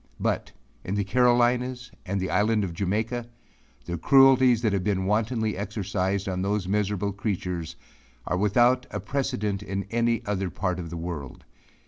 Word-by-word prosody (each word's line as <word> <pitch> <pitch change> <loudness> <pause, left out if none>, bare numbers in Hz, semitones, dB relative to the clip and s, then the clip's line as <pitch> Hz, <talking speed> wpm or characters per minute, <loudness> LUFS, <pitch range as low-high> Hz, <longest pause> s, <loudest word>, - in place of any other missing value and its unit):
But - - -1 0.3
in 95 - -3
the 100 - +1
Carolinas 125 +3 +2 0.2
and 100 +1 -1
the 95 - -2
island 105 +2 +2
of 90 -3 -3
Jamaica, 110 +6 -2 0.6
the 85 -1 -4
cruelties 130 - +5
that 110 -3 +2
have 95 -2 0
been 95 -2 0
wantonly 110 +2 0
exercised 100 -1 -2
on 90 -1 -2
those 100 -1 -1
miserable 100 0 0
creatures, 90 -5 -3 0.5
are - - -1
without 120 +6 +3
a - - -4
precedent 125 -8 -2
in 100 -1 -3
any 115 0 +1
other 100 -2 -1
part 90 0 -2
of 85 -2 -6
the 85 - -6
world. 80 -6 -6
105 Hz, 155 wpm, -26 LUFS, 95-120 Hz, 0.6 s, cruelties